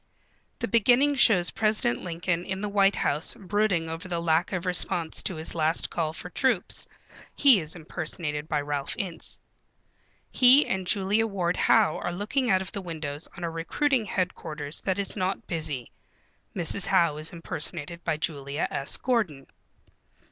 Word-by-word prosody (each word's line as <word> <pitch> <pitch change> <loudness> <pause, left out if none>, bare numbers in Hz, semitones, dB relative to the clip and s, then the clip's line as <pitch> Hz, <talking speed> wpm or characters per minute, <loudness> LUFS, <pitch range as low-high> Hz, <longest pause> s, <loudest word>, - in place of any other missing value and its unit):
The - - -2
beginning 245 +5 +4
shows 210 -10 +3
President 215 - +1
Lincoln 170 0 -2
in 190 +1 -4
the 210 - -2
White 200 -1 +3
House 150 +9 0
brooding 200 -5 0
over 165 +3 -6
the 175 -2 -2
lack 170 +1 +1
of 180 -2 -3
response 175 -2 0
to 185 - -3
his 160 0 -4
last 160 0 +1
call 160 -2 -1
for 180 +2 -8
troops. 240 -6 0 0.5
(He 270 -7 +6
is 160 -1 -5
impersonated 155 -2 -4
by 150 -1 +1
Ralph 145 -1 -3
Ince.) 175 -4 -3 0.9
He 260 +3 +7
and 190 -1 -2
Julia 205 +4 +2
Ward 180 -4 -1
Howe 155 - +3
are - - -3
looking 220 +7 -1
out 190 -1 +3
of 190 - -8
the 200 - -5
window 160 -5 -5 0.2
on 175 - -7
a 170 - -1
recruiting 235 - 0
headquarters 165 -6 -3
that 190 -1 -1
is 200 -2 -2
not 185 +1 -2
busy. 155 -7 -3 0.6
(Mrs. 180 +2 0
Howe 165 -4 +3
is 155 +1 -4
impersonated 170 0 -4
by 165 -2 0
Julia 145 -1 -2
S. 140 - +1
Gordon.) 200 - -1
175 Hz, 160 wpm, -27 LUFS, 160-200 Hz, 0.9 s, He